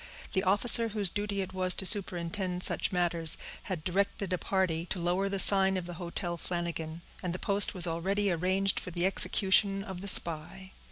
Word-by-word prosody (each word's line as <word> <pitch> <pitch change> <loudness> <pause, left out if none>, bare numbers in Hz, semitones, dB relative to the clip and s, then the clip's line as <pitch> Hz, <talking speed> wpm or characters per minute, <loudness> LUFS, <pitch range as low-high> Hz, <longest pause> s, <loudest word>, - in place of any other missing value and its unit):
The 190 - 0
officer 215 +4 +2
whose 205 -4 0
duty 205 -1 -4
it 190 0 -8
was 185 -1 +2
to 190 - 0
superintend 180 -1 0
such - - +4
matters, 170 -3 +1 0.3
had 180 -5 -6
directed 195 +1 -3
a - - -1
party 180 -3 -3
to 190 - -4
lower 180 +3 -2
the 195 - -4
sign 190 0 +5
of 180 - -6
the 175 - -7
Hotel 170 0 -6
Flanagan, 170 -1 -6 0.2
and 180 -2 -5
the - - -5
post 200 +2 +3
was 180 -2 +2
already 190 +4 -2
arranged 185 +3 -1
for - - -10
the 175 0 -2
execution 195 +1 +1
of 190 -2 -9
the 200 - -8
spy. 185 +2 +4
185 Hz, 185 wpm, -28 LUFS, 175-195 Hz, 0.3 s, sign